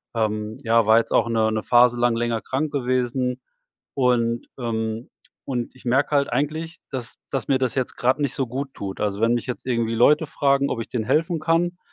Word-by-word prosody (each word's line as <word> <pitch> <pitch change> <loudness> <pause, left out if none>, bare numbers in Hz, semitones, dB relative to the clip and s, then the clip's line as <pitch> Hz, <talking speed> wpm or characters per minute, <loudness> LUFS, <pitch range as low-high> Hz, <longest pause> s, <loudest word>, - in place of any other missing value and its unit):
ähm 110 -1 -1
ja, 115 -1 +3
war 110 +1 +6
jetzt - - -4
auch 115 - +3
'ne 110 -1 +2
'ne 110 -1 -2
Phase 120 0 +4
lang 120 -1 +2
länger 115 -1 -1
krank 145 +3 -2
gewesen 125 -1 -1 0.5
und, 120 -3 +1
ähm, 110 -1 -3 0.4
und 125 -3 -3
ich 130 - -18
merke 135 +4 +2
halt 140 -1 +2
eigentlich, 155 +6 -2
dass 125 -4 -5
dass 135 - -2
mir 135 - +3
das 130 -3 0
jetzt 130 -2 -2
grad 130 +4 +2
nicht 140 -4 -1
so 135 - 0
gut 135 +3 -5
tut. 95 -1 -6
Also, 105 0 -1
wenn 115 +1 +3
mich 120 - -3
jetzt 125 - -5
irgendwie 115 -2 0
Leute 150 +7 +4
fragen, 140 0 +1
ob 115 - -2
ich - - -8
denen 115 -3 -2
helfen 160 - +1
kann, 170 +3 +1
125 Hz, 205 wpm, -23 LUFS, 115-140 Hz, 0.5 s, war